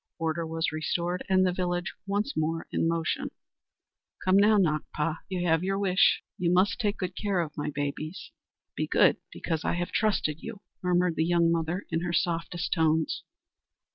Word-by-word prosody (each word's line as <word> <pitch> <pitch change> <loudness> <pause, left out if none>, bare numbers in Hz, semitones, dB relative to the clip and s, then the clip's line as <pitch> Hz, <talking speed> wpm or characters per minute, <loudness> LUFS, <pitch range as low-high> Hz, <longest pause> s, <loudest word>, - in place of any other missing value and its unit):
Order 165 0 -1
was 160 0 -1
restored 170 +3 -2
and 185 0 +4
the 180 - +1
village 175 -1 -2
once 205 +7 -1
more 160 +1 -1
in - - +1
motion. 165 -1 -1 1.0
"Come 185 0 +4
now, 210 +2 +6
Nakpa; 155 -2 0
you 180 -2 -2
have 165 +1 +3
your 195 +1 0
wish. 195 -2 +3 0.2
You 175 -1 +2
must 190 +4 +3
take 210 -3 0
good 185 -1 -4
care 200 -3 0
of 160 -3 -3
my 145 0 -2
babies. 145 +3 -4 0.4
Be - - -1
good, - - +4
because 160 -2 -3
I - - 0
have 175 0 -2
trusted 190 -8 +1
you," 225 -3 -8 0.2
murmured 180 -2 +1
the 160 - +3
young 170 0 +3
mother 170 +3 -1
in 165 - +1
her 175 -1 -2
softest 170 +1 -1
tones. 160 -2 +1
175 Hz, 170 wpm, -28 LUFS, 160-185 Hz, 1.0 s, now